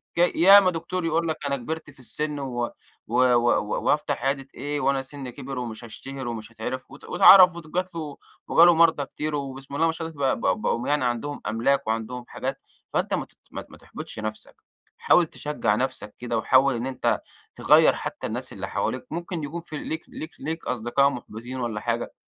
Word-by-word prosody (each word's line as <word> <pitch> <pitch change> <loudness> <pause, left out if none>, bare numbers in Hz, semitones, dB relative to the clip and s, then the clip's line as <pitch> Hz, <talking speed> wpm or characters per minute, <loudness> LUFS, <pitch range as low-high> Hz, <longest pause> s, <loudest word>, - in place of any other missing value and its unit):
ك - - -3 0.2
ياما 190 +2 +7
دكتور 170 +1 -3
يقول 165 +1 +1
لك 160 -1 -1
أنا 140 0 0
كبرت 160 +6 -5
في - - -17
السن 150 +3 -4
و 120 -3 -3 0.4
و 125 +3 +3
و 120 0 +3 0.2
وهافتح 145 -3 +1
عيادة 135 0 -1
إيه 145 +2 -3
وأنا 135 -1 +2
سني 135 -1 -8
كبِر 135 0 -6
ومش 115 -1 -6
هاشتهر 130 +3 -7
ومش 115 -1 -6
هاتعرف 125 +4 -6
وت 140 - -13
واتعرف 185 -2 +8
وجَت 170 +2 -4
له 150 -3 -5 0.3
وجَه 165 - +7
له 175 - +7
مرضى 160 -4 +4
كتير 150 +2 -4
وبسم 135 0 -6
الله 165 +3 +2
ما 165 - +3
شاء 160 0 -5
الله 140 -5 0
بقوا 95 -5 +1
بقوا 115 +2 -1
يعني 145 -3 +1
عندهم 120 +4 -2
أملاك 135 +4 +1
وعندهم 115 +2 -3
حاجات، - - -4 0.3
فأنت - - 0
ما - - +2 0.3
ما - - -5
ت - - -23
ما - - -13
تحبطش - - -9
نفسك 110 0 -6 0.4
حاول 175 - +4
تشجَّع 150 -10 -1
نفسك 125 -3 -3
كده، 120 -1 -2
وحاول 130 +3 +4
إن 120 +2 -3
أنت 130 -1 0 0.3
تغيَّر - - +5
حتى - - -5
الناس - - -5
اللي - - -5
حواليك - - -2
ممكن 170 -1 -4
يكون 165 +4 -5
في 155 -2 -8
ليك 160 +2 -5
ليك 160 +1 -7
ليك 160 +2 -5
أصدقاء 125 +3 +2
محبطين 120 0 -7
والَّا 115 -3 -2
حاجة، 120 0 -2
140 Hz, 190 wpm, -25 LUFS, 120-160 Hz, 0.4 s, واتعرف